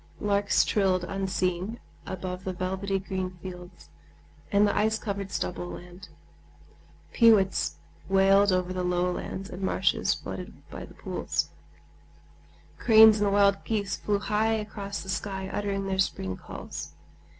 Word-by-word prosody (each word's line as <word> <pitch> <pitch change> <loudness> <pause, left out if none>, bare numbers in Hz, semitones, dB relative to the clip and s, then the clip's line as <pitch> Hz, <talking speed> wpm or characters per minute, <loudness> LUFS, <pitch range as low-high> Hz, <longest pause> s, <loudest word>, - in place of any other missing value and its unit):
Larks 200 0 +2
trilled 190 -3 +2
unseen 190 +2 -2 0.3
above 185 0 -5
the 190 - -3
velvety 190 +2 -2
green 185 -1 -4
fields 180 - -10 0.6
and 205 +1 +5
the - - 0
ice 220 +1 +2
covered 200 -3 -4
stubble 175 -2 -3
land; 175 +2 -10 1.0
peewits 215 -5 +4 0.3
wailed 195 +1 +5
over 185 0 0
the 185 - -2
low 180 0 +1
lands 190 +2 -5
and 185 - -7
marshes 190 -2 +1
flooded - - -8
by - - -7
the - - -16
pools; - - -2 1.3
cranes 220 -2 +7
and 205 -1 +2
wild 200 0 +4
geese 205 -3 -1
flew 205 -1 0
high 215 +2 +1
across 210 -2 -4
the - - -13
sky 190 0 -3
uttering 200 -1 -2
their 190 -1 -2
spring 95 - 0
calls. 75 - -8
195 Hz, 135 wpm, -27 LUFS, 185-205 Hz, 1.3 s, cranes